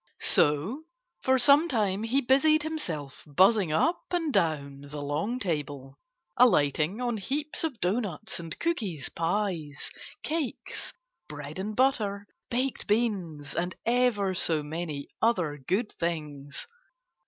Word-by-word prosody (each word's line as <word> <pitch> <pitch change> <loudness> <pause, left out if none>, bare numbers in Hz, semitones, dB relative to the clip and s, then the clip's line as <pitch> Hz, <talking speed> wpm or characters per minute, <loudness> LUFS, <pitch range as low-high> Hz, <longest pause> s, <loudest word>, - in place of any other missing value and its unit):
So 185 - +2 0.4
for 260 0 +3
some 280 +6 +7
time 210 - +1
he 240 +5 +1
busied 295 +4 +4
himself 170 - -3
buzzing 190 +4 +4
up 325 - +2
and 330 -5 -1
down 145 -6 0
the 150 0 -6
long 150 - -1
table, 145 - -3 0.4
alighting 165 - +3
on 240 -2 -1
heaps 290 - -1
of 300 -8 -2
doughnuts 205 0 -1
and 165 -2 -7
cookies, 205 - -2
pies, 165 -4 -2 0.3
cakes, 310 -4 -3 0.4
bread 150 +2 -7
and 210 +3 -3
butter, 210 -6 +1 0.2
baked 255 +2 -1
beans 190 -10 -1
and 175 +2 -2
ever 230 -5 +2
so 160 -4 +2
many 150 -2 -4
other 180 -11 +1
good 210 +4 0
things. 150 -4 -3
195 Hz, 120 wpm, -28 LUFS, 150-245 Hz, 0.4 s, some